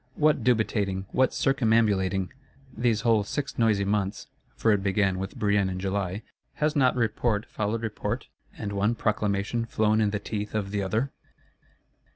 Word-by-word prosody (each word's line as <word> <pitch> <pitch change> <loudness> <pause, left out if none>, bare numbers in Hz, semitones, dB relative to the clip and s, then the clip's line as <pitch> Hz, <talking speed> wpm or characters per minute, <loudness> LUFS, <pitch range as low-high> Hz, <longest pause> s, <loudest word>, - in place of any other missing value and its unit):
What 150 -5 +2
dubitating, 105 -5 +1
what 130 0 +3
circumambulating! 110 -7 +2 0.4
These 115 -3 +1
whole 115 -3 +3
six 140 +7 -4
noisy 105 -4 +3
months 100 -1 -1 0.3
(for 115 - +2
it 105 -2 +2
began 95 -1 +1
with 95 +7 -5
Brienne 100 -4 +2
in 90 0 -4
July,) 95 +1 -2 0.3
has 150 0 0
not 130 -3 +3
Report 115 -2 0
followed 110 +2 -3
Report, 110 -2 -3 0.3
and 100 -1 -4
one 105 +4 +1
Proclamation 105 +1 0
flown 110 0 +2
in 105 - +3
the 105 - -1
teeth 105 +1 -5
of 100 -2 -2
the 100 -1 -1
other? 110 +8 -1
105 Hz, 155 wpm, -27 LUFS, 100-115 Hz, 0.4 s, what